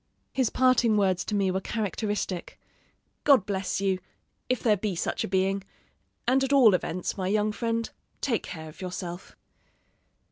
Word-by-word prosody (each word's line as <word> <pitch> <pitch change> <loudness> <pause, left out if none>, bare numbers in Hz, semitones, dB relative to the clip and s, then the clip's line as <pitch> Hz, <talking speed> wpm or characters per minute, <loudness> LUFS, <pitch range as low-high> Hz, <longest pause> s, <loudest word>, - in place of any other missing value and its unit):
"His 260 -4 +2
parting 255 -4 +3
words 190 -3 +2
to 210 - -2
me 195 -2 +2
were 190 +1 -1
characteristic: 205 -3 -3 0.6
'God 270 -10 +5
bless 195 -2 -2
you, 195 -2 +1 0.5
if 255 - 0
there 220 -3 +4
be 200 -1 -2
such - - -1
a - - -2
being; 195 +1 +1 0.6
and 265 +2 +4
at 270 - -1
all 255 -7 +7
events, 180 +1 -2
my 185 - -1
young 210 +2 +2
friend, 230 +1 -1 0.3
take 240 -6 0
care 160 -2 -8
of 155 - -12
yourself.'" 180 -1 -6
200 Hz, 155 wpm, -27 LUFS, 185-230 Hz, 0.6 s, all